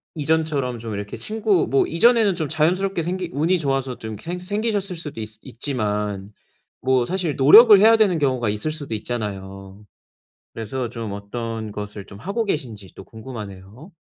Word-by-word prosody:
이전처럼 150 Hz, -5 st, 0 dB
좀 110 Hz, -1 st, -6 dB
이렇게 100 Hz, 0 st, -5 dB
친구 215 Hz, -4 st, +1 dB
뭐 135 Hz, -, +3 dB
이전에는 220 Hz, +2 st, +4 dB
좀 160 Hz, -3 st, -2 dB
자연스럽게 175 Hz, +4 st, +1 dB
생기 180 Hz, +1 st, -3 dB
운이 165 Hz, +6 st, +2 dB
좋아서 135 Hz, -5 st, -1 dB
좀 110 Hz, -, -7 dB
이렇게 105 Hz, -, -10 dB
생 175 Hz, +2 st, -3 dB
생기셨을 205 Hz, 0 st, -2 dB
수도 150 Hz, -7 st, -7 dB
있 110 Hz, -, -5 dB
있지만 105 Hz, -5 st, -3 dB, 0.5 s
뭐 130 Hz, -1 st, +2 dB
사실 180 Hz, -1 st, -2 dB
노력을 210 Hz, -, +9 dB
해야 220 Hz, +3 st, +7 dB
되는 195 Hz, -7 st, +3 dB
경우가 130 Hz, -6 st, +1 dB
있을 105 Hz, +9 st, -2 dB
수도 145 Hz, -6 st, -6 dB
있잖아요. 100 Hz, -3 st, -6 dB, 0.7 s
그래서 120 Hz, +2 st, -4 dB
좀 115 Hz, -3 st, -5 dB
어떤 110 Hz, +2 st, -5 dB
것을 105 Hz, -1 st, -7 dB
좀 100 Hz, -, -11 dB
하고 200 Hz, -, -2 dB
계신지 115 Hz, -, -4 dB
또 -, -, -10 dB
궁금하네요. 110 Hz, -, -10 dB
135 Hz, 360 characters per minute, -22 LUFS, 105-175 Hz, 0.7 s, 노력을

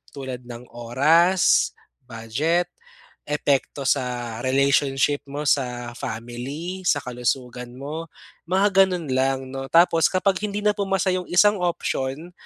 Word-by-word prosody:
Tulad 130 Hz, -3 st, -6 dB
ng 120 Hz, 0 st, -9 dB
oras, 155 Hz, +10 st, +3 dB, 0.3 s
budget, 125 Hz, +10 st, -1 dB, 0.6 s
epekto 145 Hz, -1 st, 0 dB
sa 120 Hz, -3 st, -1 dB
relationship 140 Hz, +1 st, +2 dB
mo 145 Hz, +2 st, -5 dB
sa 125 Hz, -4 st, 0 dB
family, 130 Hz, +13 st, -6 dB
sa 145 Hz, -, +3 dB
kalusugan 125 Hz, 0 st, -3 dB
mo 150 Hz, +5 st, -6 dB, 0.4 s
mga 195 Hz, +1 st, +4 dB
gano'n 180 Hz, -4 st, -4 dB
lang 130 Hz, +1 st, +1 dB
'no. 135 Hz, 0 st, -5 dB
Tapos 165 Hz, -1 st, +5 dB
kapag 190 Hz, +1 st, +1 dB
hindi 205 Hz, 0 st, -3 dB
na 210 Hz, -, +5 dB
pumasa 195 Hz, -1 st, 0 dB
yung 180 Hz, -1 st, -3 dB
isang 205 Hz, +3 st, +4 dB
option 165 Hz, -2 st, -2 dB
140 Hz, 120 wpm, -23 LUFS, 125-175 Hz, 0.6 s, Tapos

